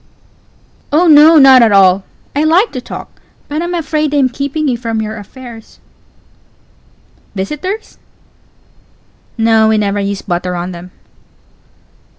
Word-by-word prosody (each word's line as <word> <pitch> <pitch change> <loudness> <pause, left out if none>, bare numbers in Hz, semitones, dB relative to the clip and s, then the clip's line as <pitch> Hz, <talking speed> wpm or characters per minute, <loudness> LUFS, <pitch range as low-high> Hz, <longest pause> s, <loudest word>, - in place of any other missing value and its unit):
Oh 315 +5 +3
no, 315 0 +6
not 265 -3 +7
at 225 -2 +4
all; 190 -1 +4 0.3
I 290 - +1
_like 345 +8 +2
_to 255 - -7
talk - - -10 0.3
but 300 +2 -4
I'm 350 +1 -3
afraid 305 -2 -2
I'm 270 -3 +2
keeping 280 +4 -3
you 255 - 0
from 230 -2 -4
your 220 0 -4
affairs. 225 +2 -12
Pause. - - -36
Visitors? 300 - -4
Pause. - - -23 1.4
No, 225 -1 +3
we 220 0 +2
never 205 -1 -1
use 200 0 -4
butter 180 0 -3
on 175 +1 -5
them. 175 +1 -10
245 Hz, 140 wpm, -13 LUFS, 200-300 Hz, 1.4 s, not